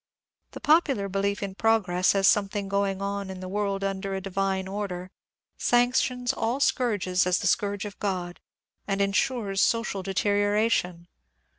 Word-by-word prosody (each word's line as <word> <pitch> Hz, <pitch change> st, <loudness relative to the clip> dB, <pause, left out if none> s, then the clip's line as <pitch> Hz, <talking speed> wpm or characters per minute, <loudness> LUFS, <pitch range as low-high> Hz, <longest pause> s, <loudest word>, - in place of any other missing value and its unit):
The -, -, -7 dB
popular 290 Hz, -10 st, +3 dB
belief 200 Hz, +1 st, -1 dB
in 195 Hz, -1 st, -4 dB
^^ -, -, -47 dB
progress," 200 Hz, -5 st, +2 dB
as 195 Hz, 0 st, +3 dB
something 200 Hz, -1 st, +2 dB
going 195 Hz, 0 st, -1 dB
on 200 Hz, -1 st, -3 dB
in 190 Hz, -1 st, -7 dB
the 185 Hz, -, -7 dB
world 200 Hz, 0 st, -2 dB
under 195 Hz, 0 st, -2 dB
a -, -, -2 dB
divine 190 Hz, 0 st, -2 dB
order, 190 Hz, -2 st, -5 dB, 0.5 s
sanctions 245 Hz, 0 st, +2 dB
all 230 Hz, +3 st, -1 dB
sooui^ges 205 Hz, -10 st, +1 dB
as 180 Hz, -, +3 dB
the -, -, -4 dB
scourges 205 Hz, 0 st, 0 dB
of -, -, -37 dB
God, 180 Hz, -3 st, -3 dB, 0.5 s
and 195 Hz, -1 st, -1 dB
insures 200 Hz, 0 st, 0 dB
social 230 Hz, -3 st, +1 dB
deterioration. 205 Hz, -2 st, 0 dB
200 Hz, 150 wpm, -26 LUFS, 190-210 Hz, 0.5 s, popular